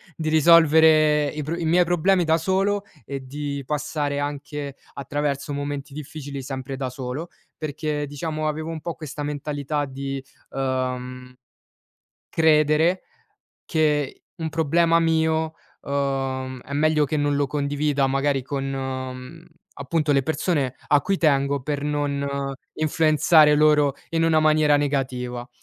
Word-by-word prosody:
di 155 -1 -2
risolvere 155 -1 +5
i 150 +1 -4
pro 155 +4 -3
i 170 - -3
miei 175 +3 +4
problemi 175 +2 +2
da 160 0 +3
solo 195 +4 0 0.2
e 140 -1 -5
di 140 +1 -4
passare 145 0 -2
anche 145 -1 -5 0.2
attraverso 140 +1 -3
momenti 145 0 -4
difficili 145 -1 -7
sempre 135 0 -5
da 130 -1 -3
solo. 130 +5 -5 0.3
Perché 150 -1 -3
diciamo, 155 +2 -3
avevo 155 +1 -3
un 165 -1 -4
po' 170 +1 -4
questa 150 -1 -7
mentalità 145 0 -3
di, 135 0 -5 0.3
uhm, 125 -1 -3 1.0
credere 160 +2 +3 0.6
che 150 -4 0
un 160 -3 -4
problema 165 +2 +3
mio, 160 -1 +1 0.3
uhm, 135 -2 -2
è 140 - -11
meglio 155 +1 +3
che 155 - -1
non 145 -1 +1
lo 145 0 +1
condivida 145 0 0
magari 135 0 0
con, 135 +1 -3
uhm, 130 +3 -6 0.3
appunto 150 +2 0
le 135 -1 +3
persone 145 -2 -1
a 145 - +5
cui 195 +7 0
tengo, 140 -4 +2
per 145 +1 -3
non 140 -1 -2 0.2
influenzare 155 0 +4
loro 150 -2 +4 0.2
in 165 0 +1
una 160 -1 +4
maniera 155 -1 +4
negativa. 130 -4 -2
145 Hz, 135 wpm, -23 LUFS, 140-155 Hz, 1.0 s, risolvere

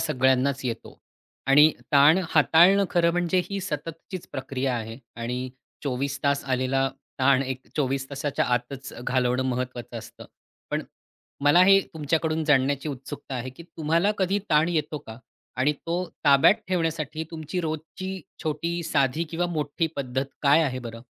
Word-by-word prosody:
सगळ्यांनाच 130 -2 +2
येतो 120 -2 -5 0.5
आणि 150 +3 +7 0.2
ताण 145 +4 +7
हाताळणं 170 +6 +5
खरं 170 -1 +3
म्हणजे 175 +1 +1
ही 200 0 -2
सततचीच 165 +1 -6
प्रक्रिया 130 -1 -2
आहे 115 0 -6 0.2
आणि 125 +2 -3 0.3
24 140 0 -2
तास 140 0 +1
आलेला 135 +1 +1 0.3
ताण 135 0 +4
एक 130 -1 -5
24 135 -2 -1
तासाच्या 140 0 -1
आतच 125 +3 -2
घालवणं 125 0 +1
महत्त्वाचं 125 -2 -3
असतं. - - -11 0.5
पण - - -1 0.6
मला 150 +5 +6
हे 195 +1 +7
तुमच्याकडून 160 +1 0
जाणण्याची 140 0 +2
उत्सुकता 135 0 -7
आहे 130 +1 -4
की 130 +6 -13
तुम्हाला 170 +4 0
कधी 195 +1 +1
ताण 155 +1 +4
येतो 155 -3 -1
का? 110 -4 -11 0.4
आणि 130 +4 +2
तो 170 +5 -3 0.2
ताब्यात 140 +6 +6
ठेवण्यासाठी 160 -3 -1
तुमची 160 +2 -4
रोजची 165 +4 -5 0.2
छोटी 165 +3 -2
साधी 150 -1 +1
किंवा 175 +1 0
मोठी 155 -1 -1
पद्धत 130 -1 -2 0.2
काय 145 +3 +5
आहे 130 -4 -1
बरं? 115 -2 -8
145 Hz, 140 wpm, -25 LUFS, 130-165 Hz, 0.6 s, आणि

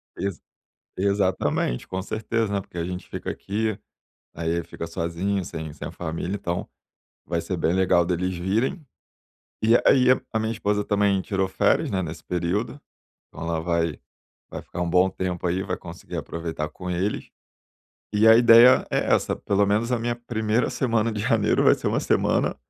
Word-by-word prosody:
Ex 100 -5 -3 0.6
exatamente. 95 -9 0
Com 95 0 -3
certeza, 110 +2 -2
né, 100 - 0
porque 90 - -13
a 85 - -1
gente 90 0 -6
fica - - -5
aqui, 110 +1 -2 0.6
aí 85 +1 -1
fica 85 - -7
sozinho, 85 +4 -2
sem 80 -2 -6
sem 75 - -7
família, 85 +3 -4
então 90 -3 -3 0.6
vai - - -1
ser - - -3
bem 85 - +1
legal 90 -2 +3
deles 90 +1 -1
virem. 110 - -1 0.8
E 115 +2 +5
aí 130 -1 +5 0.3
a 110 - +1
minha 110 0 -1
esposa 105 -2 0
também 100 -2 +2
tirou 95 0 -1
férias, 95 - +1
né, 95 - 0
nesse 80 -2 -6
período, 90 +10 -2 0.5
então - - -12
ela 85 -1 -1
vai 85 -2 -1 0.5
vai - - -6
ficar 90 - -5
um 85 - -2
bom 90 +2 +4
tempo 90 -1 -3
aí, 90 +2 0
vai - - -3
conseguir - - -9
aproveitar 80 -2 -4
com 90 -1 -7
eles. 95 +4 -2 0.9
E 105 +2 +4
a 110 - +9
ideia 120 +1 +7
é - - 0
essa, - - -1
pelo 100 0 +1
menos 110 +5 +1
a 125 - +2
minha 120 +1 -2
1ª 115 -1 -1
semana 115 -3 0
de 105 - -4
janeiro 110 -2 +2
vai - - +7
ser - - -3
uma - - +1
semana - - +1
95 Hz, 170 wpm, -24 LUFS, 85-110 Hz, 0.9 s, a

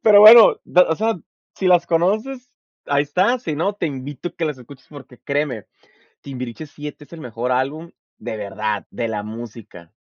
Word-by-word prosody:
Pero 205 -2 +7
bueno, 225 +2 +9
de 180 - +3
o 160 - 0
sea, 220 -2 -1 0.4
si 190 - -3
las 175 -1 +4
conoces, 220 +10 -1 0.3
ahí 140 0 +2
está. 185 - +1
Si 165 -10 -4
no, 170 +7 -1
te 175 - -2
invito 140 +2 -6
a - - -30
que 165 - -3
las 150 -4 -3
escuches 130 +2 -15
porque, 135 -4 -13
créeme, 140 -6 -3 0.6
Timbiriche 125 +1 -7
VII 150 0 -7
es 150 - -16
el 165 - -9
mejor 120 0 -3
álbum, 145 +6 -2 0.3
¡de - - -6
verdad! 105 0 -4
De 115 -1 -3
la 105 -2 -3
música. 110 -6 -10
145 Hz, 185 wpm, -20 LUFS, 120-180 Hz, 0.6 s, bueno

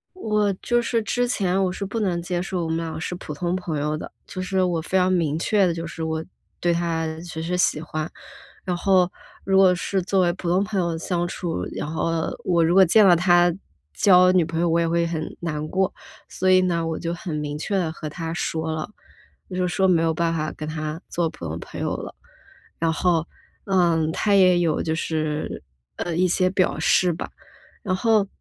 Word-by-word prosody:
我 210 - +1
就 240 +5 0
是 230 -1 0
之 245 +3 0
前， 195 -5 +1
我 185 - 0
是 200 - -4
不 210 +4 -3
能 180 -5 0
接 175 0 -2
受 180 -2 -2
我 160 - -3
们 160 - 0
俩 165 -1 -4
是 180 - -3
普 175 - -7
通 175 +4 -2
朋 175 -4 -3
友 150 +1 -1
的， - - -7 0.2
就 185 - -5
是 190 0 0
我 175 -3 +1
非 190 +3 0
常 185 0 +3
明 160 -4 +1
确 200 +3 +2
的 175 - +1
就 165 0 -5
是 165 - -7
我 160 0 -2 0.3
对 175 - +1
他 165 -1 -1
只 165 -2 -6
是 180 +2 -1
喜 155 -4 +2
欢。 155 0 -4 0.5
然 180 -2 -1
后 185 -1 +3 0.3
如 195 0 +2
果 185 -1 +6
是 190 +2 -1
作 195 +1 +1
为 175 -1 +2
普 180 -1 -5
通 180 +3 +3
朋 205 -1 -3
友 170 -2 -1
相 175 +1 -1
处， 170 -2 -3
然 - - -3
后 165 0 -1 0.2
我 170 -2 +3
如 170 +2 +2
果 190 - +8
见 205 +4 +5
了 180 - +7
他 175 0 +4 0.4
交 185 - +6
女 180 -2 +4
朋 165 +1 -3
友， 170 - +2
我 165 - +2
也 165 - +1
会 170 0 +1
很 160 -2 -4
难 155 -3 -3
过。 190 0 0 0.4
所 185 - 0
以 185 0 +6
呢， 170 -2 0
我 160 -1 -2
就 170 0 -3
很 175 -2 -5
明 150 0 -3
确 195 +6 -1
地 170 -4 0
和 155 -1 -6
他 165 +2 -5
说 160 -2 -2
了， 155 +3 -4 0.6
就 185 - -6
是 180 -1 +1
说 190 +2 +2
没 170 -3 +4
有 165 -1 +2
办 165 +1 0
法 155 -1 -2
跟 155 0 -7
他 155 +1 -4
做 170 -2 -1
普 - - -10
通 80 +1 -4
朋 - - -8
友 - - -1
了。 - - -8 0.7
然 165 -1 +2
后， 170 -1 +1 0.4
嗯， 170 -5 +2
他 205 +3 +1
也 185 -2 +6
有 165 -3 +1
就 160 - -1
是， 155 - -2 0.3
呃， 170 -2 -3
一 185 +2 +3
些 185 +1 +2
表 185 -1 +1
示 180 -2 +3
吧。 165 - -6 0.5
然 185 -3 -1
后 215 0 +3
175 Hz, 235 characters per minute, -23 LUFS, 160-185 Hz, 0.7 s, 果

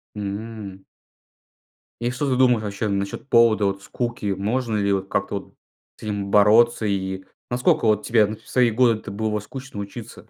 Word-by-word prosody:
М. 100 -1 -6 1.2
И 120 +1 0
что 135 +3 -2
ты 130 - +1
думаешь 125 -3 +4
вообще 105 +2 -3
насчёт 100 +5 -3
повода 115 -4 +4
вот 100 0 -2
скуки? 120 -2 -4
Можно 110 +4 -1
ли 100 -1 +1
вот, 95 0 -2
как-то 100 +1 -1
вот - - -17 0.4
с - - -16
этим 100 -2 -3
бороться? 110 +3 +5
И 95 -2 -1
к - - -32 0.2
насколько 125 -1 +2
вот, 105 -1 +2
тебе 115 -2 +4
в - - -22
свои 125 -2 +3
годы-то 115 -1 +1
было 105 +1 -1
скучно 130 +1 -8
учиться? 105 +3 -10
105 Hz, 170 wpm, -23 LUFS, 100-120 Hz, 1.2 s, бороться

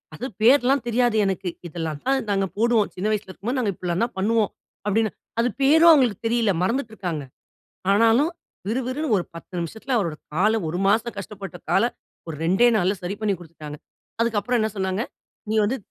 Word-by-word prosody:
"அது 240 - -5 0.2
பேர்லாம் 260 +2 +5
தெரியாது 240 -1 +2
எனக்கு. 190 -1 -1 0.2
இதெல்லாம் 160 -3 -4
தான் 270 -1 +1
நாங்க 195 -1 +1
போடுவோம். 225 -1 +3
சின்ன 185 +3 -2
வயசுல 210 -3 -2
இருக்கும்போது, 220 +8 -4
நாங்க 220 -5 +1
இப்டிலாம் 180 +3 -2
தான் 240 - -9
பண்ணுவோம்" 215 +2 +2 0.4
அப்படின்னு, 215 +2 +2 0.3
அது 240 +2 +3
பேரும் 320 +5 +7
அவங்களுக்கு 250 - +3
தெரியல. 230 -2 +2
மறந்துட்டுருக்காங்க. 205 - -2 0.7
ஆனாலும் 230 +9 +4 0.4
விறு 235 +5 0
விறுன்னு 295 +5 -2
ஒரு 180 - -1
10 165 +2 -11
நிமிஷத்தில 220 - -4
அவரோட 170 -8 0 0.2
கால 215 +7 +3
ஒரு 170 +3 -2
மாசம் 225 +3 +1
கஷ்டப்பட்ட 200 -2 -7
கால - - +4 0.4
ஒரு 160 - -5
2 190 +8 +4
நாள்ல 190 0 +2
சரி 180 +3 -3
பண்ணி 215 -2 +1
குடுத்துட்டாங்க. 155 -3 -10 0.4
அதுக்கப்புறம் 235 +1 +1
என்ன 220 0 0
சொன்னாங்க, 190 +2 -1 0.5
'நீ 220 - +1
வந்து 235 +6 0
215 Hz, 165 wpm, -23 LUFS, 185-240 Hz, 0.7 s, பேரும்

